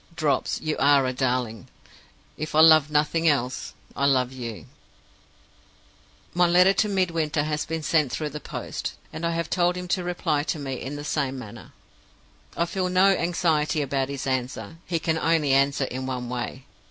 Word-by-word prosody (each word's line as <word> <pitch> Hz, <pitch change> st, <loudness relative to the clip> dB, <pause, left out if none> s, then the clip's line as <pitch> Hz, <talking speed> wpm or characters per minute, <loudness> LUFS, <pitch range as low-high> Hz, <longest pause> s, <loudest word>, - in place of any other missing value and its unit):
'Drops,' 145 Hz, -5 st, 0 dB
you 155 Hz, -1 st, -1 dB
are 140 Hz, -1 st, +5 dB
a 130 Hz, -, -1 dB
darling! 125 Hz, -5 st, -2 dB, 0.7 s
If 155 Hz, 0 st, -5 dB
I -, -, +5 dB
love 155 Hz, -2 st, +7 dB
nothing 155 Hz, +2 st, +1 dB
else, 130 Hz, -4 st, 0 dB, 0.2 s
I 140 Hz, -, +2 dB
love 130 Hz, -2 st, +2 dB
you. 120 Hz, -4 st, -7 dB, 1.7 s
"My 175 Hz, 0 st, +4 dB
letter 180 Hz, +3 st, +5 dB
to 210 Hz, +2 st, +1 dB
Midwinter 165 Hz, -6 st, 0 dB
has 150 Hz, 0 st, -2 dB
been 160 Hz, 0 st, -3 dB
sent 150 Hz, -4 st, +2 dB
through 150 Hz, +3 st, -3 dB
the 150 Hz, +1 st, -7 dB
post; -, -, -5 dB, 0.2 s
and 160 Hz, -, -6 dB
I 170 Hz, -, +1 dB
have 165 Hz, -1 st, -2 dB
told 175 Hz, 0 st, +1 dB
him 180 Hz, 0 st, -5 dB
to 180 Hz, 0 st, 0 dB
reply 175 Hz, -4 st, -1 dB
to 155 Hz, +2 st, -2 dB
me 140 Hz, -2 st, -4 dB
in 140 Hz, +2 st, -5 dB
the 145 Hz, -, -6 dB
same 135 Hz, -3 st, -1 dB
manner. 110 Hz, -5 st, -10 dB, 0.9 s
"I 170 Hz, -, +2 dB
feel 180 Hz, +1 st, -2 dB
no 185 Hz, +2 st, +5 dB
anxiety 160 Hz, -4 st, +1 dB
about 135 Hz, -1 st, -1 dB
his 140 Hz, -1 st, -4 dB
answer 130 Hz, -1 st, -3 dB
he 175 Hz, -, 0 dB
can 160 Hz, 0 st, -1 dB
only 160 Hz, -4 st, +2 dB
answer 140 Hz, +1 st, +3 dB
in 130 Hz, 0 st, -4 dB
one 125 Hz, -2 st, -4 dB
way. 125 Hz, +2 st, -5 dB
150 Hz, 175 wpm, -25 LUFS, 130-165 Hz, 1.7 s, love